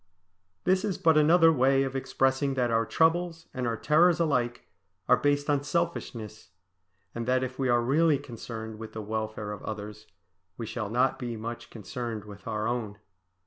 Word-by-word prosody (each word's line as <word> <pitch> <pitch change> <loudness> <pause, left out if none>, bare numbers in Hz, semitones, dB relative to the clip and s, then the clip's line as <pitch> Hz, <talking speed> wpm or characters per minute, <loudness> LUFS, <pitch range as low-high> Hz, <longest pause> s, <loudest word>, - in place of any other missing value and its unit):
This 185 +1 +2
is 205 -4 -1
but 160 -1 +4
another 165 +2 +6
way 135 0 +3
of 135 0 -4
expressing 135 +1 +1
that 125 -2 +1
our 115 0 +2
troubles 165 0 +1
and 125 -2 -2
our 115 -1 -1
terrors 170 +6 +4
alike 125 -7 0 0.4
are - - +7
based 145 0 +1
on 145 -2 +2
selfishness, 140 -9 -3 0.6
and 115 0 -4
that 130 0 +2
if 130 +1 -5
we 130 -1 +1
are 120 -1 +3
really 150 +4 +3
concerned 115 -4 -8
with 110 -1 -8
the 110 - -5
welfare 110 0 -4
of 105 - -7
others 105 0 -7 0.5
we 115 - -4
shall 105 -2 -4
not 125 +4 +1
be 120 -3 -4
much 115 +2 -6
concerned 115 -1 -6
with 100 -1 -12
our 110 -1 -1
own. 115 -4 -3
125 Hz, 175 wpm, -28 LUFS, 110-145 Hz, 0.6 s, are